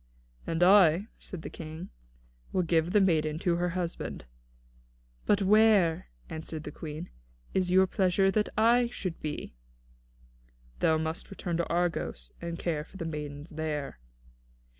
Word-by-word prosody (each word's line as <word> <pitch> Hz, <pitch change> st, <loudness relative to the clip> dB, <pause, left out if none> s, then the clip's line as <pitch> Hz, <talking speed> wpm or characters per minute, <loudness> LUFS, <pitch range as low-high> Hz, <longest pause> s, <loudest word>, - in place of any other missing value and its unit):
"And 165 Hz, +1 st, +1 dB
I," 190 Hz, +1 st, +6 dB
said 180 Hz, -5 st, -8 dB
the -, -, -5 dB
King, 160 Hz, -, -8 dB, 0.6 s
"will 185 Hz, -, +1 dB
give 165 Hz, 0 st, +2 dB
the 210 Hz, -, +5 dB
maiden 155 Hz, -5 st, +2 dB
to 170 Hz, 0 st, +1 dB
her 175 Hz, +1 st, 0 dB
husband." 175 Hz, -, -4 dB, 1.0 s
"But 205 Hz, -1 st, +3 dB
where," 200 Hz, -, +4 dB, 0.2 s
answered 160 Hz, -1 st, -6 dB
the 150 Hz, -, -6 dB
Queen, 155 Hz, +3 st, -7 dB, 0.4 s
"is 185 Hz, -1 st, +1 dB
it -, -, +1 dB
your 190 Hz, 0 st, +7 dB
pleasure 190 Hz, +1 st, +2 dB
that 210 Hz, +1 st, +1 dB
I 235 Hz, +2 st, +5 dB
should 185 Hz, -7 st, -5 dB
be?" 150 Hz, -, -5 dB, 1.3 s
"Thou 160 Hz, -, +3 dB
must 160 Hz, +1 st, -3 dB
return 175 Hz, -3 st, -3 dB
to 170 Hz, -, -1 dB
Argos, 170 Hz, -, -1 dB
and 170 Hz, 0 st, -4 dB
care 160 Hz, -4 st, -2 dB
for 190 Hz, -, -14 dB
the 165 Hz, -, -4 dB
maidens 150 Hz, 0 st, -6 dB
there." 150 Hz, -, -4 dB
170 Hz, 145 wpm, -29 LUFS, 160-190 Hz, 1.3 s, your